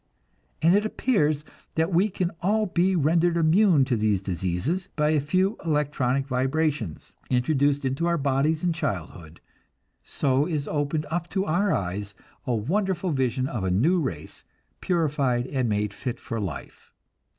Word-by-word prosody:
And 165 +2 +6
it 205 - +3
appears 155 - 0 0.3
that 165 +3 +1
we 190 +5 +3
can 180 -2 -2
all 215 +4 +2
be 185 0 +1
rendered 165 +2 +2
immune 165 -2 +4
to 125 -2 0
these 105 -3 +1
diseases, 95 - -2
by 150 -1 +2
a 155 - +3
few 185 +8 0
electronic 140 -4 0
vibrations, 135 - -1 0.2
introduced 140 +2 +1
into 135 +6 0
our 170 0 +2
bodies 145 +3 +1
in 175 -1 +2
childhood; 85 - -5 0.6
so 140 +2 0
is 150 -5 -2
opened 150 +1 -1
up 170 0 -2
to 195 0 -1
our 195 +5 +1
eyes 100 +2 -3 0.3
a 125 - +1
wonderful 185 - -1
vision 130 -2 0
of 120 -7 -4
a 95 - 0
new 145 - +3
race, 85 - -5 0.4
purified 145 -8 0
and 130 -3 -1
made 105 -1 -1
fit 125 +3 -5
for 115 - -5
life. 95 -8 -7
145 Hz, 150 wpm, -25 LUFS, 125-170 Hz, 0.6 s, And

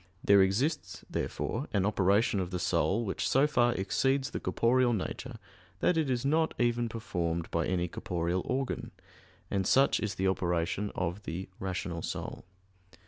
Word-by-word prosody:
There 100 -1 +6
exists, 125 - 0
therefore, 130 +6 -2
an 100 -2 +2
operation 100 +1 +2
of 90 -2 -2
the 90 - -3
soul 90 +5 +1
which 95 - -1
so 135 +2 +4
far 120 -5 +3
exceeds 135 +8 +1
the - - -3
corporeal 120 +1 +2
nature 115 +4 -4 0.4
that 180 - +3
it 160 -4 +1
is 125 0 0
not 160 +3 +2
even 120 -1 +1
performed 85 -7 -3
by 85 -1 0
any 90 -1 0
corporeal 85 +1 -2
organ; 130 +1 -2 0.6
and 95 -2 0
such 135 +1 +4
is 105 -3 -2
the 95 +1 0
operation 90 +1 0
of 90 +2 -2
the 95 0 -5
_rational 90 -3 -3
soul. - - -5
100 Hz, 155 wpm, -30 LUFS, 90-125 Hz, 0.6 s, There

